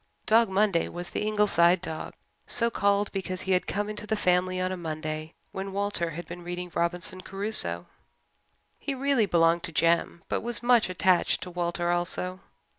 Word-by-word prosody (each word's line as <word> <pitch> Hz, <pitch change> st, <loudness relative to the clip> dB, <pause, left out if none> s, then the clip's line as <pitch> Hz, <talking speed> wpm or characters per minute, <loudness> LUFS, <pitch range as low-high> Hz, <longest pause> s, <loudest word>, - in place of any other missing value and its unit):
Dog 225 Hz, 0 st, +4 dB
Monday 195 Hz, -3 st, +2 dB
was 175 Hz, 0 st, -7 dB
the -, -, -3 dB
Ingleside 190 Hz, -4 st, +3 dB
dog, 160 Hz, -3 st, -5 dB, 0.3 s
so 235 Hz, -1 st, +1 dB
called 200 Hz, -1 st, +1 dB
because 185 Hz, -1 st, -4 dB
he 190 Hz, -, -3 dB
had 180 Hz, -1 st, +2 dB
come 205 Hz, +1 st, -2 dB
into 210 Hz, 0 st, -6 dB
the 220 Hz, -, 0 dB
family 185 Hz, -2 st, +1 dB
on 185 Hz, 0 st, -1 dB
a -, -, -2 dB
Monday 155 Hz, -2 st, -5 dB, 0.2 s
when 195 Hz, 0 st, -5 dB
Walter 200 Hz, -4 st, -1 dB
had 170 Hz, +2 st, -7 dB
been 175 Hz, +1 st, -8 dB
reading 175 Hz, 0 st, -6 dB
Robinson 175 Hz, +2 st, +1 dB
Crusoe. 190 Hz, -, +2 dB, 0.9 s
He 280 Hz, -, -3 dB
really 265 Hz, -5 st, +1 dB
belonged 170 Hz, -1 st, +3 dB
to 170 Hz, -, -6 dB
Jem 170 Hz, +1 st, +1 dB
but -, -, -1 dB
was 240 Hz, +1 st, -1 dB
much 240 Hz, -4 st, +4 dB
attached 185 Hz, 0 st, +2 dB
to 180 Hz, -, -7 dB
Walter 175 Hz, 0 st, -1 dB
also. 180 Hz, +1 st, -1 dB
185 Hz, 175 wpm, -27 LUFS, 170-205 Hz, 0.9 s, Dog